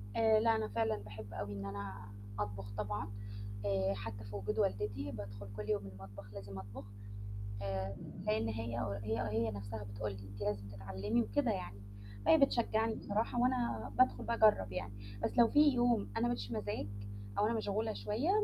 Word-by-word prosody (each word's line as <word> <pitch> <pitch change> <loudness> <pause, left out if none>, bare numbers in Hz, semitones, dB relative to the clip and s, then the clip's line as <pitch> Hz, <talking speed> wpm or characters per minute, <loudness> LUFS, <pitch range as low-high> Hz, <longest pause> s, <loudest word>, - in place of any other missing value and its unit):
آآ 220 -1 +6
لأ 225 0 +5
أنا 220 -1 0
فعلًا 225 - +1
باحب 105 +1 -8
أوي 100 0 -3
إن 100 0 -4
أنا 100 0 -5 0.3
أطبخ 100 -1 -3
طبعًا، 105 -1 -1 0.6
آآ 95 -1 +2
حتى 100 0 -5
في 100 0 -7
وجود 100 0 -1
والدتي 100 -1 0
بادخل 100 -1 -6
كل 105 0 -5
يوم 100 -2 +1
المطبخ 100 +1 -10
لازم 100 -1 -6
أطبخ، 100 0 -8 0.8
آآ 95 0 -2 0.3
لأن 110 +1 +2
هي 115 +1 -2 0.3
هي 110 +1 0
هي 110 +1 +1
نَفْسها 100 +1 -5
بتقُول 100 +1 -3
لي: 100 - -7
"أنتِ 100 +1 -9
لازم 100 -1 -1
تتعلمي." 100 +3 0
وكده 100 -3 +2
يعني، 100 +2 -4 0.4
فهي 320 - +8
بتشجّعني 225 -5 +3
بصراحة 220 +4 0
وأنا 250 -1 +1
بادخل 255 - +5
باجرّب 215 - +5
يعني، 100 +2 -3 0.3
بس - - 0
لو 235 - +9
في 295 - +4
يوم 240 - +3
أنا 120 - +3
ما 120 - +2
ليش 100 -1 -4
مزاج 105 -3 -2 0.5
أو 210 - +5
أنا 230 - +2
مشغولة 220 0 0
شوية 235 - 0
105 Hz, 175 wpm, -36 LUFS, -, 0.8 s, لو